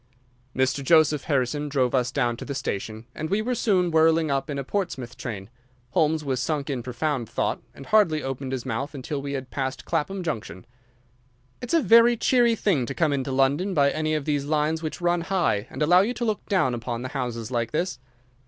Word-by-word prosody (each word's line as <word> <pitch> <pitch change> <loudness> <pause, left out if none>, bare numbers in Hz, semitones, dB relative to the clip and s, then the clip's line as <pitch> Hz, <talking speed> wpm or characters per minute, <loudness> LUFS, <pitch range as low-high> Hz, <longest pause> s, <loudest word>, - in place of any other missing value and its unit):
Mr. 130 +1 +1
Joseph 155 -1 +4
Harrison 145 +1 0
drove 130 -3 +1
us 125 -1 +1
down 120 -4 0
to - - -7
the 140 - -5
station, 110 -3 -4
and 155 +1 -4
we 200 - +1
were 240 +4 -1
soon 185 -7 +1
whirling 160 -1 +3
up 135 +1 -1
in 145 - -3
a 140 - -2
Portsmouth 135 - -3
train. 100 -5 -6 0.4
Holmes 155 0 +1
was 130 -2 -1
sunk 145 0 -2
in 130 -3 -2
profound 125 0 -2
thought, - - -1
and 135 - -10
hardly 170 -7 +3
opened 135 0 -4
his 130 -2 -3
mouth 135 +4 -3
until 140 +1 -4
we 140 0 -4
had 135 -2 -5
passed 130 -1 -3
Clapham 190 +5 -2
Junction. 110 - -5 1.0
"It's 245 +6 -1
a 325 - +3
very 235 +1 +6
cheery 240 0 +3
thing 165 - +1
to 135 - -5
come 160 -4 +2
into 135 -1 -2
London 140 +9 +1
by 140 -2 +4
any 155 0 -1
of 150 -2 -2
these 145 -2 0
lines 155 +2 0
which 160 +1 -5
run 175 0 +2
high, 165 - 0
and - - -2
allow 175 +4 +6
you 235 +5 -1
to 240 - -2
look 215 -2 -1
down 180 -11 +2
upon 120 0 -4
the 130 - -4
houses 125 -4 -4
like 115 -2 -1
this." 170 -3 -2
145 Hz, 210 wpm, -25 LUFS, 130-170 Hz, 1.0 s, very